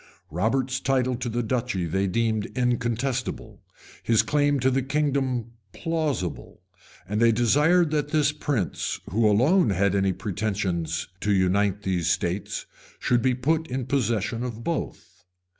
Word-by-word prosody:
] - - -35
Robert's 125 - 0
title 130 -1 +1
to 120 - -3
the 120 +2 -1
duchy 110 -6 -1
they 95 +4 0
esteemed 110 +2 0
incontestable; 125 +1 -2 0.4
his 115 -2 +3
claim 145 -1 +2
to 130 +1 +2
the 135 +1 +1
kingdom 135 -4 -1 0.2
plausible; 155 - -3 0.4
and 105 +3 -1
they 115 - +6
all - - +3
desired 150 +9 +3
that 150 -2 0
this 150 -1 +2
prince, 145 - -2
who 110 +2 +3
alone 145 - +4
had 100 0 +2
any 95 -1 +2
pretensions 100 -4 -2
to 105 - 0
unite 100 +1 +2
these 90 -3 0
states, 90 +3 -2 0.3
should 120 -1 +1
be 130 +1 +2
put 155 +6 0
in 130 0 -3
possession 115 -3 0
of 120 -2 -5
both. 100 - -5
120 Hz, 145 wpm, -25 LUFS, 100-135 Hz, 0.4 s, they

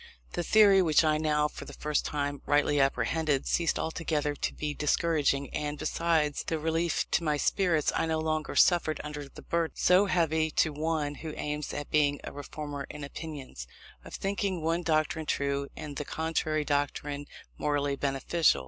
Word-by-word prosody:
The - - -1
theory, 200 +1 +6
which 160 -3 +4
I 155 -1 +2
now 150 -1 +2
for - - -9
the - - -10
first 150 -1 -1
time 145 -1 -2
rightly 145 0 +3
apprehended, 135 +2 +1
ceased 170 -1 +1
altogether 155 -2 -1
to - - -2
be 150 -1 -3
discouraging; 150 -2 +1
and, 150 0 -2
besides 160 -3 0
the 160 - 0
relief 165 +2 0
to 170 - +2
my 150 -2 +1
spirits, 170 -1 +2
I - - +1
no 160 0 0
longer 155 -1 -2
suffered 165 -4 +4
under 150 -2 -6
the - - -13
burden 170 -1 -1
so 185 +3 +5
heavy 160 -3 +2
to 155 0 +1
one 155 -1 -1
who 155 -1 -6
aims 150 0 -3
at 145 - -5
being 145 -2 +3
a - - -6
reformer 145 0 -6
in 150 - -7
opinions 140 - -7 0.4
of - - -8
thinking 195 -3 -2
one 165 +2 +1
doctrine 155 -1 0
true 140 0 0
and 145 -1 -6
the - - -2
contrary 155 0 -1
doctrine 145 0 -2 0.3
morally 145 -1 0
beneficial. 140 +4 +2
150 Hz, 170 wpm, -29 LUFS, 145-160 Hz, 0.4 s, theory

